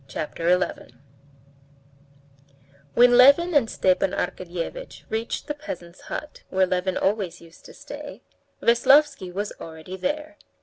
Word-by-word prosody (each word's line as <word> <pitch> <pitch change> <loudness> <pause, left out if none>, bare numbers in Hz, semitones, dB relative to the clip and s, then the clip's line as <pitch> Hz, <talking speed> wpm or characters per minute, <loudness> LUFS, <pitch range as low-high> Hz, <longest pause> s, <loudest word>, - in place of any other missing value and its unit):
Chapter 160 +4 -3
11 180 -9 -1 2.0
When 245 0 +6
Levin 280 +8 +6
and 265 -7 +3
Stepan 185 0 +1
Arkadyevitch 180 - -5
reached 225 +1 -3
the 295 - -3
peasant's 290 - -9
hut 300 - -7
where 190 0 +3
Levin 185 0 -1
always 195 -4 -1
used 165 0 -18
to - - -12
stay, - - -10 0.4
Veslovsky 270 -3 +4
was 205 +3 -4
already 160 +3 -8
there. 300 +7 -3
205 Hz, 120 wpm, -24 LUFS, 180-285 Hz, 2.0 s, When